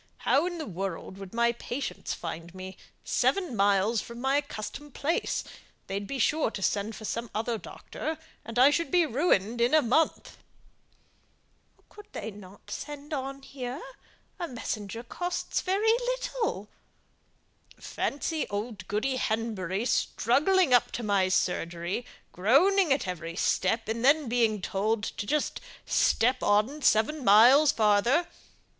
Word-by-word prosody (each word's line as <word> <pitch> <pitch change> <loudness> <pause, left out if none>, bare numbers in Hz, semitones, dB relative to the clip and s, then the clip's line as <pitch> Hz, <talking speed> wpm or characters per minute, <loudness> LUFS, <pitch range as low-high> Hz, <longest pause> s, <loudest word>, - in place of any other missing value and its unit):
How 350 - +3
in 350 -1 -4
the 315 - -4
world 190 -1 -5
would 195 -2 -9
my 235 0 +2
patients 240 +3 -5
find 165 +1 -6
me 185 0 -7
out, 190 - -13 0.3
seven 360 -11 0
miles 200 +2 +2
from 235 0 -9
my 265 +3 +2
accustomed 285 +1 -6
place? 320 +4 -1 0.4
They'd 200 +1 -4
be 275 - -4
sure 300 +4 +2
to 210 - -7
send 205 +3 0
for 215 - -8
some 230 +2 -3
other 225 +1 -1
doctor, 315 +8 -6 0.3
and 230 +1 -7
I 260 +3 +7
should 335 +3 0
be 355 -2 +4
ruined 235 - +1
in 245 +6 +4
a 310 - +6
month." 305 +7 0 1.5
"Couldn't 415 0 -16
they 220 - -5 0.3
send 295 0 -7
on 275 0 -4
here? 260 0 -6 0.6
A 345 - -2
messenger 225 - -5
costs 355 +8 -3
very 410 +4 +2 0.2
little." 445 - -3 1.1
"Fancy 305 +3 -2
old 210 +2 -5
Goody 255 +6 -1
Henbury 215 -3 -2
struggling 280 - +2
up 245 - +4
to 240 - -4
my 200 -3 +2
surgery, 175 +4 -1 0.2
groaning 315 - +4
at 265 -6 +1
every 165 -2 -5
step, 225 +6 +1
and 230 +2 -2
then 290 +1 +4
being 225 -4 +1
told 210 +2 0
to 205 - -4
just 300 +3 -1 0.2
step 250 +2 +2
on 215 +9 +2
seven 270 +5 +2
miles 250 +8 +7
farther! 220 +9 +3
235 Hz, 140 wpm, -28 LUFS, 205-290 Hz, 1.5 s, I